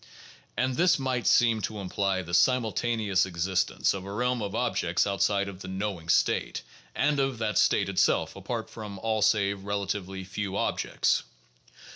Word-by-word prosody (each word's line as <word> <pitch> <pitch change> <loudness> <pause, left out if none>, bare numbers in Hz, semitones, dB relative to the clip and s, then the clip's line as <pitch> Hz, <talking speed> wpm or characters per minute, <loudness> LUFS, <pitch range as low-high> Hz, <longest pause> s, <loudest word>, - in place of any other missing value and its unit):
And 130 0 +1
this 180 +1 +4
might 130 -3 -1
seem 115 -2 +4
to 105 +2 -4
imply 95 -1 -1
the 85 0 -9
simultaneous 110 -2 +2
exist 95 +1 0
ence - - +1
of 95 -1 -5
a 100 - -7
realm 125 +3 0
of 100 0 -4
objects 95 -8 +1
outside 100 0 +1
of 95 -1 -8
the - - -7
"knowing 95 -3 -4
state" - - +1 0.3
and 145 -1 +1
of 135 -2 0
that 110 -1 0
state - - +3
itself - - +1
apart - - -4
from 105 -3 -8
all 110 +2 -1
save 100 -2 +2
relatively 100 -1 -3
few 100 +1 -4
objects. - - 0
100 Hz, 160 wpm, -27 LUFS, 95-115 Hz, 0.3 s, this